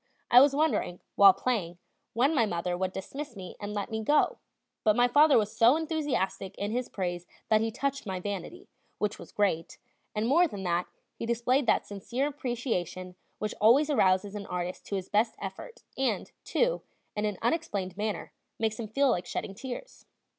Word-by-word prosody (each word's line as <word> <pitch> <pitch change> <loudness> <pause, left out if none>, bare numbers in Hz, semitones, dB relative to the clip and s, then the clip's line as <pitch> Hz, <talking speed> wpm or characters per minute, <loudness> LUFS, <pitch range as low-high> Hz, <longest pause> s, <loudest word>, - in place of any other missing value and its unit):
I 245 - +10
was 275 0 +5
wondering, 295 - +1
while 200 -1 +9
playing, 190 -4 -2 0.4
when 265 +7 +3
my 235 -7 +3
mother 175 -1 -2
would 185 +1 -1
dismiss 270 +8 -6
me 185 -2 -8
and 205 0 -5
let 205 +2 -3
me 220 0 -2
go; 295 +6 +3 0.4
but 215 -2 +4
my 245 +1 +5
father 290 +4 +6
was 215 0 0
so 235 +4 +6
enthusiastic 285 - -2
in 205 +1 -2
his 245 +2 -2
praise 175 -2 -3 0.2
that 215 -1 +4
he 225 - 0
touched 275 +2 -3
my 190 -1 -3
vanity 205 - -6 0.3
which 210 0 -2
was - - -11
great 190 -6 0 0.4
and 215 +2 0
more 340 +7 +5
than 200 -9 -7
that; 175 0 0 0.3
he 230 - -6
displayed 240 +3 +1
that - - +3
sincere 235 +7 -3
appreciation 240 -10 -3 0.2
which 215 0 -3
always 270 +8 +5
arouses 195 -5 +3
an 205 -1 -6
artist 180 0 -4
to 200 - -2
his 190 -1 -3
best 220 +2 +1
effort, 200 - -8
and, 265 -1 -1
too, - - +1 0.3
in 210 0 -1
an 210 -3 -2
unexplainable 225 - -1
manner, 210 +1 -3 0.2
makes 220 0 -1
him 225 - -3
feel 275 +4 +2
like 175 -4 -1
shedding 195 - -4
tears. 260 - -8
215 Hz, 180 wpm, -29 LUFS, 190-265 Hz, 0.4 s, I